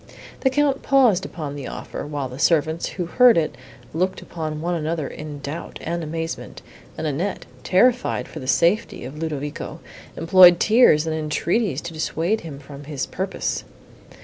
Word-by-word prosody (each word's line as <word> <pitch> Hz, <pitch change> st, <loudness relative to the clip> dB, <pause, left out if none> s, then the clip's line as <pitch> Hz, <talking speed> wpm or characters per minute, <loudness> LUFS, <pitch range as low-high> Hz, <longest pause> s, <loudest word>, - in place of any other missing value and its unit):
The 265 Hz, -, +2 dB
Count 280 Hz, 0 st, +1 dB
paused 245 Hz, -9 st, +3 dB
upon 150 Hz, -4 st, -6 dB
the 140 Hz, -2 st, -6 dB
offer, -, -, -6 dB
while 145 Hz, -2 st, -3 dB
the 130 Hz, +2 st, -9 dB
servants, 160 Hz, +1 st, +2 dB
who 180 Hz, -, -4 dB
heard 245 Hz, +5 st, +5 dB
it, 160 Hz, -2 st, 0 dB, 0.4 s
looked 185 Hz, +4 st, 0 dB
upon 155 Hz, -2 st, -5 dB
one 175 Hz, +3 st, -1 dB
another 160 Hz, -2 st, -2 dB
in 150 Hz, -1 st, -8 dB
doubt 145 Hz, +4 st, -6 dB
and 170 Hz, +1 st, -2 dB
amazement, 165 Hz, +1 st, -5 dB, 0.3 s
and 160 Hz, -, -3 dB
Annette, 160 Hz, +7 st, -2 dB, 0.2 s
terrified 245 Hz, +6 st, +2 dB
for 155 Hz, -, -8 dB
the 130 Hz, -, -8 dB
safety 175 Hz, -, +1 dB
of 140 Hz, +4 st, -8 dB
Ludovico, 150 Hz, -3 st, -4 dB, 0.4 s
employed 175 Hz, 0 st, +7 dB
tears 215 Hz, -9 st, +5 dB
and 160 Hz, -1 st, -1 dB
entreaties 160 Hz, -, 0 dB
to 170 Hz, -, -7 dB
dissuade 165 Hz, +6 st, -1 dB
him 155 Hz, -4 st, -8 dB
from 140 Hz, 0 st, -11 dB
his 145 Hz, -3 st, -3 dB
purpose. 190 Hz, +1 st, -3 dB
165 Hz, 160 wpm, -22 LUFS, 150-185 Hz, 0.4 s, employed